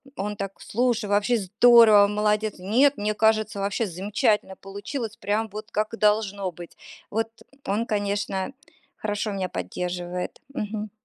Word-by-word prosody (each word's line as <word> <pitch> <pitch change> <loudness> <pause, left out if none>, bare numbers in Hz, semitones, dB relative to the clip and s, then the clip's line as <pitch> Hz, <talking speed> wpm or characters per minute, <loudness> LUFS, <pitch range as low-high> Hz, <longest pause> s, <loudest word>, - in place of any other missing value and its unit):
он 210 -1 -3
так: 195 -1 -5
"Слушай, 240 -1 0
вообще 210 +4 +2
здорово, 215 +1 +6
молодец. 210 0 0
Нет, 245 +10 +3
мне 210 +1 -1
кажется, 215 -1 +2
вообще 200 +3 -1
замечательно 200 +2 0
получилось, 210 +4 -6
прям 215 +2 -1
вот 215 +2 -8
как 215 +1 -1
и 225 - -5
должно 205 -3 +1
быть". 170 0 -11 0.4
Вот 225 +1 -1 0.4
он, 210 +4 0
конечно, 205 0 -2 0.4
хорошо 210 0 -2
меня 190 -2 -2
поддерживает. 180 - -4
Мгм. 215 -3 -4
210 Hz, 135 wpm, -25 LUFS, 195-220 Hz, 0.4 s, здорово